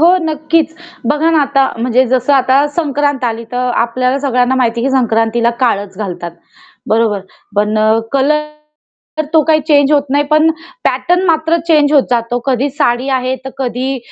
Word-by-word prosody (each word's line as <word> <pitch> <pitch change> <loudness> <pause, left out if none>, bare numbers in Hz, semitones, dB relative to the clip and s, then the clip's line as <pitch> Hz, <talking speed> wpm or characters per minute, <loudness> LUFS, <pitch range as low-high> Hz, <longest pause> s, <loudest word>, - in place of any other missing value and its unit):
हो 345 +3 +5
नक्कीच. 315 0 0 0.3
बघा 300 +5 +1
ना 320 -2 +3
आता 275 -1 +1
म्हणजे 250 +2 +2
जसं 255 +2 +1
आता 270 +1 +3
संक्रांत 290 -4 -1
आली, 230 -1 -2
तर 250 0 -1
आपल्याला 250 +3 0
सगळ्यांना 255 -2 +1
माहिती 235 -2 0
आहे 245 - -1
की - - -2
संक्रांतीला 230 -1 +1
काळंच 200 -5 -1
घालतात. 180 -4 -5 0.6
बरोबर. 220 -2 +1 0.4
पण 210 +1 +1 0.3
कलर 300 +3 +1 0.7
तर 310 - 0
तो 320 -1 +5
काही 315 -1 +3
चेंज 285 -2 +4
होत 290 -2 +4
नाही 290 +1 +2
पण 310 +2 +3 0.3
पॅटर्न 355 +1 +1
मात्र 325 0 +2
चेंज 300 -3 +3
होत 285 -3 +5
जातो. 240 0 0
कधी 265 +1 +1
साडी 260 -2 0
आहे, 255 0 -2
तर 265 - -6
कधी 260 +1 -2
265 Hz, 165 wpm, -14 LUFS, 240-300 Hz, 0.7 s, हो